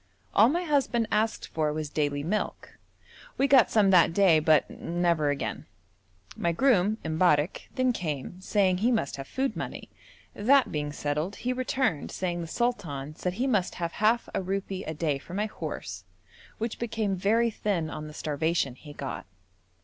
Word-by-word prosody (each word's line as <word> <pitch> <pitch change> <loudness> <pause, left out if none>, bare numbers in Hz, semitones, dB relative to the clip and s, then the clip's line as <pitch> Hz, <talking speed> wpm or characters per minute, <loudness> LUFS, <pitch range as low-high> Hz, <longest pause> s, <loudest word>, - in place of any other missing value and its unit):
All 220 +4 +6
my 345 +5 0
husband 270 -7 +1
asked 220 +1 0
for 155 -2 0
was 150 -1 -4
daily 145 -2 -1
milk. 205 +7 -3 0.6
We 275 - +3
got 270 -3 +6
some 205 -3 +4
that 175 -3 +5
day, 185 -6 +5
but 155 -1 +4
never 170 -3 0
again. 125 -7 -3 0.7
My 170 - 0
groom, 215 -1 +3
M'barrek, 160 0 +1
then 255 -2 +2
came, 165 - -4
saying 190 -2 +2
he 235 +5 +2
must 220 - -1
have 135 0 -7
food 270 0 -1
money; - - -6 0.4
that 260 +6 +3
being 150 -1 -2
settled, 150 +6 -2
he 250 +1 -2
returned 255 - -1
saying 175 -2 -3
the 165 - -5
sultan 160 - -2
said 180 +2 -2
he 240 +7 -1
must 210 -9 +1
have 170 -1 -3
half 220 +5 +2
a - - 0
rupee 195 0 -3
a 160 - -4
day 150 -3 -1
for 175 - -9
my 210 +2 0
horse, 215 - -6 0.5
which 230 0 -4
became 220 -4 -1
very 225 +5 +2
thin 180 -7 -2
on 155 +1 -6
the 150 - -10
starvation 155 -2 -1
he 145 +3 -12
got. 135 -9 -6
185 Hz, 170 wpm, -28 LUFS, 155-225 Hz, 0.7 s, All